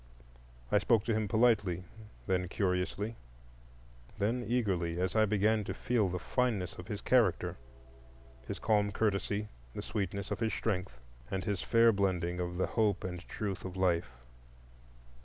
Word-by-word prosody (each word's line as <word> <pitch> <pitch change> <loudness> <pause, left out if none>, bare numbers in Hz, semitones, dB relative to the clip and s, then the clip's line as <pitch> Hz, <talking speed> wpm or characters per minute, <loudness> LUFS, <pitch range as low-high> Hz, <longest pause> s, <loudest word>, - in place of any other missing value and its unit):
I 105 - +5
spoke 105 +1 +3
to 115 - +1
him 110 -1 0
politely, 110 -6 +3 0.4
then 90 -2 0
curiously, 95 +4 -1 1.0
then 115 +5 0
eagerly, 95 -8 0
as 95 +2 0
I 110 0 +5
began 105 +1 +2
to - - -4
feel 115 -6 +1
the 90 - -2
fineness 105 -2 0
of 90 - -8
his 105 -1 -4
character,—his 65 - -2
calm 105 -2 +2
courtesy, 105 0 0 0.3
the - - -4
sweetness 100 -1 -3
of - - -2
his 115 -1 0
strength, 95 - -2 0.3
and 95 -1 -2
his 100 -4 -1
fair 115 0 +5
blending 90 -4 0
of 90 0 -3
the 95 - +2
hope 105 -4 +1
and 90 -1 -4
truth 100 -4 -3
of 95 0 -6
life. 90 -4 +2
100 Hz, 145 wpm, -32 LUFS, 90-110 Hz, 1.0 s, I